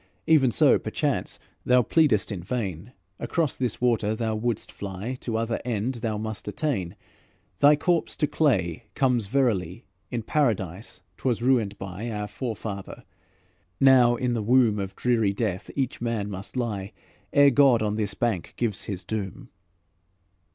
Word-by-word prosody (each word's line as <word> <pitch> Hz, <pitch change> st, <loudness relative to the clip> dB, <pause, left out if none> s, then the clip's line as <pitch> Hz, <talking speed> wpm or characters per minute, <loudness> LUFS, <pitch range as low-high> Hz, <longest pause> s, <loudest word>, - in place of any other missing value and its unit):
Even 150 Hz, -5 st, +5 dB
so, 110 Hz, -, +4 dB
perchance, -, -, -2 dB, 0.3 s
thou 125 Hz, 0 st, +4 dB
pleadest 130 Hz, -9 st, +2 dB
in 95 Hz, -4 st, -4 dB
vain. 100 Hz, -1 st, -4 dB, 0.3 s
Across 165 Hz, -6 st, -1 dB
this 125 Hz, -5 st, -2 dB
water 115 Hz, -3 st, +1 dB
thou 110 Hz, 0 st, -1 dB
wouldst 110 Hz, 0 st, -2 dB
fly, 100 Hz, +5 st, -5 dB
To 115 Hz, -2 st, -2 dB
other 115 Hz, 0 st, -2 dB
end 120 Hz, +1 st, -1 dB
thou 110 Hz, -3 st, -1 dB
must 110 Hz, -2 st, -5 dB
attain. 105 Hz, -, -2 dB, 0.6 s
Thy 145 Hz, +1 st, +7 dB
corpse 165 Hz, +2 st, 0 dB
to 150 Hz, -, +1 dB
clay 100 Hz, -, 0 dB
comes 125 Hz, -6 st, +1 dB
verily, 100 Hz, -9 st, 0 dB, 0.2 s
In 120 Hz, -2 st, -3 dB
Paradise 100 Hz, -, -1 dB
't -, -, -20 dB
was 120 Hz, -1 st, -1 dB
ruined 115 Hz, -6 st, +2 dB
by 100 Hz, +4 st, -6 dB
Our 105 Hz, -2 st, -3 dB
forefather. 105 Hz, -3 st, -6 dB, 0.8 s
Now 130 Hz, -3 st, +6 dB
in 125 Hz, 0 st, -1 dB
the 115 Hz, -, -1 dB
womb 115 Hz, -1 st, +3 dB
Of 95 Hz, -1 st, -4 dB
dreary 115 Hz, -5 st, +1 dB
death 100 Hz, -3 st, -3 dB
each 135 Hz, -4 st, -2 dB
man 115 Hz, -4 st, -2 dB
must 95 Hz, +6 st, -7 dB
lie, 105 Hz, -5 st, -3 dB, 0.4 s
Ere 140 Hz, 0 st, +6 dB
God 130 Hz, -4 st, +5 dB
on 105 Hz, -1 st, 0 dB
this 105 Hz, -2 st, -2 dB
bank 115 Hz, -8 st, -2 dB
gives 115 Hz, -5 st, -1 dB
his 95 Hz, -3 st, -4 dB
doom." 100 Hz, -4 st, -5 dB
115 Hz, 150 wpm, -26 LUFS, 100-125 Hz, 0.8 s, Thy